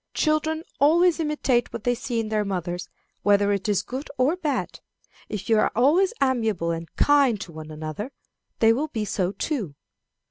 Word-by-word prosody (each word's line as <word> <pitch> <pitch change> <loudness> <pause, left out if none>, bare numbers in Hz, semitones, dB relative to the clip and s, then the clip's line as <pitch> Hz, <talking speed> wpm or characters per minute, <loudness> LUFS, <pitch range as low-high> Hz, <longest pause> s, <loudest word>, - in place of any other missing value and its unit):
Children 315 +1 +1 0.2
always 335 +4 +4
imitate 295 -6 0
what 210 - -6
they 245 - +2
see 245 -1 -3
in 220 -1 -2
their 215 -1 +1
mothers, 180 -2 -4 0.3
whether 205 0 +3
it 200 +2 -2
is 205 - +1
good 265 +4 -6
or 265 +6 +3
bad. 305 -7 -2 0.5
If 200 -2 -5
you 225 -1 +4
are - - +2
always 310 - +4
amiable 225 -11 +1
and 165 -1 -5
kind 280 -7 +4
to 180 - -7
one 155 -1 -9
another, 155 - -6 0.5
they 225 0 +5
will 285 +6 -1
be 220 -7 -3
so 190 -3 -1
too." 205 - -3
225 Hz, 175 wpm, -24 LUFS, 200-290 Hz, 0.5 s, they